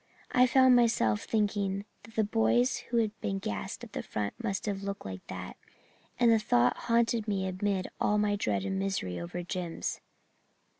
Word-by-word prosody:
I 250 0 +5
found 260 0 +6
myself 170 - +3
thinking 205 -2 0 0.2
that 225 +2 -16
the 220 - +3
boys 120 - +2
who 235 - 0
had 220 -2 +2
been 195 - -1
gassed 210 +1 -4
at 230 - -10
the - - -3
front 105 -1 -3
must 195 -1 -2
have 200 -2 -2
looked 200 0 -5
like 95 -1 -7
that, 90 -1 -7 0.6
and 240 -1 +5
the 225 - +5
thought 125 - +3
haunted 230 -1 +1
me 195 -2 0
amid 190 0 -1
all 210 - +2
my 210 -1 +2
dread 105 - -1
and 190 0 -1
misery 190 - -2
over 85 - -5
Jims. 175 -2 -4
195 Hz, 180 wpm, -30 LUFS, -, 0.6 s, found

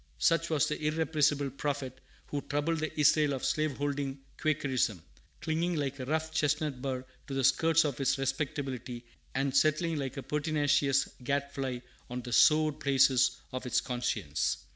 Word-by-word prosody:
Such 165 - +2
was 155 -2 +2
the 150 0 -3
irrepressible 150 -2 +1
prophet 135 -1 -4 0.2
who 145 - -3
troubled 145 +4 -1
the 155 0 -4
Israel 150 0 +4
of 130 - -3
slave 155 -3 0
holding 140 -1 -2 0.2
Quakerism, 135 - 0 0.4
clinging 170 +2 0
like 140 -2 -2
a 130 - -4
rough 160 +3 -1
chestnut 150 -3 0
bur 130 -1 -3 0.2
to 140 - -5
the 135 - 0
skirts 165 +4 +4
of 140 -2 -2
its 135 +1 +2
respectability, 135 -3 -3 0.3
and 135 0 0
settling 155 +3 +2
like 135 -1 -4
a 135 - -4
pertinacious 145 -2 +1 0.2
gad 140 +1 -1
fly 130 -3 -4 0.3
on 125 0 -5
the 120 - -5
sore 155 +2 +5
places 135 -3 +3
of 130 0 -4
its - - +2
conscience. 105 - -1
140 Hz, 160 wpm, -30 LUFS, 130-155 Hz, 0.4 s, sore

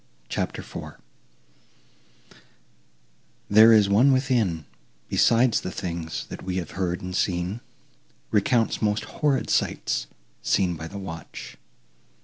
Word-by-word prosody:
CHAPTER - - -3
IV - - -8 2.6
There 110 +2 +8
is 105 -3 +6
one 115 +8 +5
within, 120 - +1 0.4
Besides 120 0 +3
the - - -4
things 85 -3 -4
that - - -7
we 90 -1 -4
have 90 -4 -3
heard 90 -2 -2
and 90 0 -5
seen, 90 +4 -1 0.7
Recounts 110 +2 +2
most 105 0 +1
horrid 145 -3 0
sights, - - 0 0.3
seen 95 -3 +1
by 80 +1 -7
the 100 - -8
watch. 85 -5 -8
100 Hz, 115 wpm, -25 LUFS, 85-115 Hz, 2.6 s, There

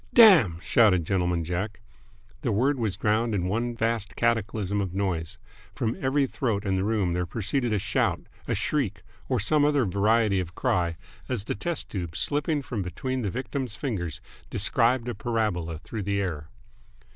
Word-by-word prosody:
"Damn!" 170 - +8
shouted 95 -8 +4
Gentleman 90 -2 0
Jack. 90 +5 -3 0.6
The - - 0
word 130 +6 +2
was 110 -5 -1
drowned 110 +1 +1
in 90 -3 0
one 115 +5 -1
vast 115 -2 -1
cataclysm 110 -3 0
of 95 -2 -4
noise. 90 -5 -2 0.4
From 115 0 -1
every 135 +1 +2
throat 115 -6 -2
in 95 -1 +1
the 95 - 0
room 100 -4 +1
there 90 0 -1
proceeded 120 - -1
a 105 - +2
shout, 100 +1 0 0.3
a - - 0
shriek, 140 -10 -1 0.3
or - - +1
some 145 +9 +3
other 145 -3 +3
variety 105 +1 +2
of 90 -1 -5
cry, 85 -2 0 0.3
as 120 -6 -1
the - - -2
test 170 +10 -3
tube, 85 -5 -4
slipping 145 0 0
from 115 -5 -3
between 130 +8 -3
the 105 - -1
victim's 125 +1 -4
fingers, 100 - -3 0.3
described 120 +1 +2
a 120 - -2
parabola 105 -10 -1
through 105 +7 -6
the 100 0 -1
air. 80 -6 -3
105 Hz, 170 wpm, -26 LUFS, 95-120 Hz, 0.6 s, Damn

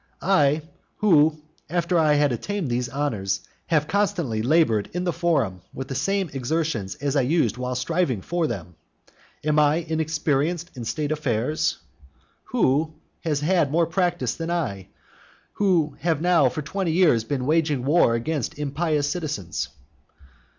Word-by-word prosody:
I, 155 -5 +3 0.3
who, 160 -6 +4 0.3
after 175 0 +1
I 155 -2 +4
had 145 -1 +3
obtained 170 - -3
those 120 0 -1
honours, 120 -9 -1 0.3
have 150 -3 +2
constantly 175 - 0
laboured 120 -5 +2
in 180 +1 -2
the 175 -2 0
forum 140 - 0
with 130 0 -6
the - - -3
same 185 +5 -1
exertions 135 -7 -2
as 145 0 -2
I 140 - +4
used 125 - +1
while 125 0 -3
striving 130 - 0
for 175 -2 0
them. 90 - -6 0.7
Am 150 0 +2
I 150 0 +4
inexperienced 160 +1 -1
in 120 -2 -6
state 150 +5 -2
affairs? 145 -1 0 0.7
Who 155 +4 +1 0.3
has 150 -3 0
had 165 -2 +2
more 165 +2 +3
practice 175 +1 0
than 165 0 -5
I, 100 - -2 0.7
who 170 -8 +1
have 165 -2 0
now 170 -5 +4
for 150 +5 -5
twenty 185 +1 -2
years 160 -11 +4
been 125 +2 -2
waging 150 -4 +1
war 145 -5 +4
against 140 +2 -2
impious 150 +1 0
citizens? 100 - -3
150 Hz, 145 wpm, -24 LUFS, 130-170 Hz, 0.7 s, who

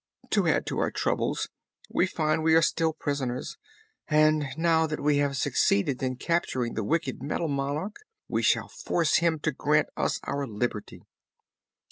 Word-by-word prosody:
To - - +2
add - - +2
to - - -3
our - - +1
troubles - - -1 0.4
we 185 - +1
find 155 -3 0
we 160 0 +4
are 165 - +6
still 160 +1 +1
prisoners; 140 -5 -3 0.5
but 155 -2 +3
now 160 -1 +3
that 150 -1 -4
we 145 0 +2
have 140 -1 0
succeeded 160 -2 +1
in 130 -1 -1
capturing 130 -5 -1
the 110 - -2
wicked 155 +2 -1
Metal 160 +3 -2
Monarch 145 +8 -2 0.3
we - - 0
shall - - +2
force 165 -3 +1
him 165 0 +2
to 155 - +1
grant 150 +2 +1
us - - 0
our 140 0 -2
liberty." 105 -1 -4
150 Hz, 160 wpm, -27 LUFS, 135-160 Hz, 0.5 s, are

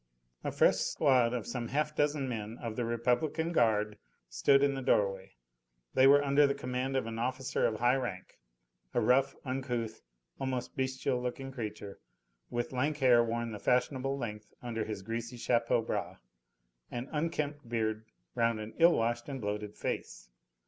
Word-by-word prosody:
A - - -2
fresh - - +4
squad 130 -6 +3
of 120 -4 -3
some 120 -2 -3
half 150 +4 -1
dozen 145 -2 +1
men 110 -2 -4
of 115 -2 -5
the 120 - -1
Republican 125 +8 0
Guard 105 -7 +2 0.3
stood 135 - +4
in 140 0 +3
the 135 - -4
doorway; 95 -6 +1 0.6
they 130 - +6
were 145 +1 +7
under 140 +1 +5
the 140 - 0
command 130 0 -2
of 130 - 0
an 115 0 -5
officer 130 +2 0
of 110 - -3
high 120 +2 +4
rank, 100 - -5 0.6
a - - +4
rough, 125 +4 +3
uncouth, 125 -4 -3 0.4
almost 130 -2 -3
bestial 130 -1 -1
looking 135 +2 -4
creature, 105 -5 -6 0.5
with 120 0 -2
lank 145 +4 0
hair 125 -4 +5
worn 115 0 -2
the 105 - -6
fashionable 130 +3 +1
length 105 -4 -6
under 115 -3 -3
his 105 -3 -5
greasy 115 +3 -4
chapeau 115 -1 +2
bras, - - -3 0.7
and 120 +2 -5
unkempt 150 -4 -2
beard 110 -1 -1 0.3
round 115 -1 +1
an 110 +1 -7
ill 170 +1 +7
washed 120 +3 0
and 135 -1 -4
bloated 105 -1 -4
face. - - -5
125 Hz, 165 wpm, -31 LUFS, 115-135 Hz, 0.7 s, were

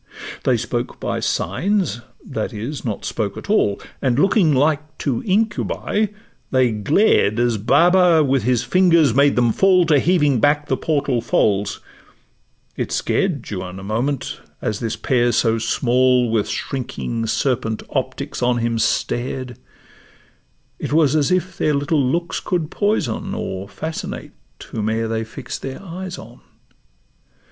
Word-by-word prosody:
They - - +3
spoke - - -3
by - - -2
signs—that 140 - -2
is, 120 +8 -5
not 110 -5 -4
spoke 105 -3 -3
at - - -5
all; 105 - +2 0.2
And 130 -3 +1
looking 185 0 +4
like 155 +2 +1
two 130 -5 -1
incubi, 210 +1 0 0.4
they 130 -2 +3
glared 110 - +2
As 120 -3 +1
Baba 170 - +4
with 135 -2 +2
his 120 +1 +1
fingers 165 -1 +4
made 140 +2 +4
them 120 -2 +3
fall 185 -2 +4
To 150 -3 +4
heaving 150 -4 +2
back 145 +3 +2
the 130 - +2
portal 140 -5 0
folds: 105 -3 +1 0.9
it - - -3
scared 160 -11 0
Juan 90 -2 -5
a - - -9
moment, 120 +7 -2 0.2
as 105 -1 -2
this 115 -2 -2
pair 120 -2 +1
so 115 -1 +2
small 125 +1 +2
With 110 -2 0
shrinking 120 -3 -3
serpent 110 -2 -1
optics - - -3
on 125 0 +2
him 115 -1 -1
stared; 125 +2 -1 1.2
It - - -4
was 155 -2 +4
as 150 0 +2
if 185 0 -1
their 150 - +2
little 145 +2 +1
looks 170 +7 -1
could 170 -4 -2
poison 205 -1 -1
Or 100 - -5
fascinate 160 +9 -6 0.3
whome'er 110 +1 -2
they 110 0 -2
fix'd 110 - -7
their 135 0 -6
eyes 185 0 -7
on. 120 +2 -12
130 Hz, 140 wpm, -20 LUFS, 115-165 Hz, 1.2 s, looking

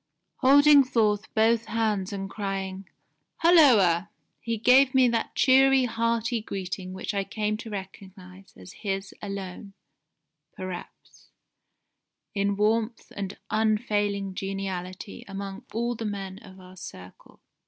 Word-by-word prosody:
Holding 285 +2 +7
forth 215 -4 0
both 225 +1 +3
hands 215 -4 -1
and 195 -1 -4
crying, 195 -2 -5 0.5
'Hulloa!' 215 - +5 0.3
he 230 0 -3
gave 255 +4 +5
me 260 -1 +6
that 230 -1 -2
cheery 265 0 +5
hearty 230 0 -1
greeting 190 -2 -5
which 190 +3 -5
I 200 -1 0
came 210 +2 -2
to 225 - -8
recognise 190 -1 -10
as 90 -1 -12
his 195 -1 -4
alone, 195 0 -7 0.8
perhaps, 185 -1 -9 1.0
in 200 0 0
warmth 220 +2 0
and 195 -1 -5
unfailing 210 -3 0
geniality 195 0 -5
among 195 0 -7
all 235 +3 -1
the 225 -1 -6
men 195 -2 -5
of 190 0 -14
our 185 0 -14
circle. 90 - -12
205 Hz, 120 wpm, -26 LUFS, 195-230 Hz, 1.0 s, Holding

